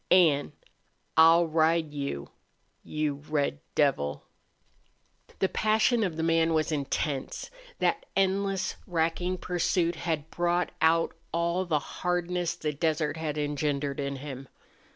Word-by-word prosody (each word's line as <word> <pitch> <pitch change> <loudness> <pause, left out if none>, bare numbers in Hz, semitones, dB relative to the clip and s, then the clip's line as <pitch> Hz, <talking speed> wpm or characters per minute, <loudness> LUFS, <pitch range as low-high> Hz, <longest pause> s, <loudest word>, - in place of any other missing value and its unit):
An' 155 -6 +4 0.6
I'll 165 +2 +7
ride 160 -1 +2
you 140 - -4 0.5
you 150 -2 -2
red 145 - 0 0.2
devil!" 130 - +1 1.1
The 190 - +2
passion 220 +3 +2
of 175 -5 -2
the 160 - -1
man 165 0 +3
was 155 +1 +1
intense. 145 - -2 0.3
That - - 0
endless, 195 0 +1
racking 175 +2 0
pursuit 175 -1 0
had 160 -3 -3
brought 175 +1 0
out 165 +1 +3 0.2
all 170 +2 0
the 160 -4 +1 0.2
hardness 180 -1 0
the 150 -1 -3
desert 155 0 0
had 155 -2 -3
engendered 145 -1 -1
in 140 0 -2
him. 135 -1 -7
160 Hz, 120 wpm, -28 LUFS, 145-175 Hz, 1.1 s, I'll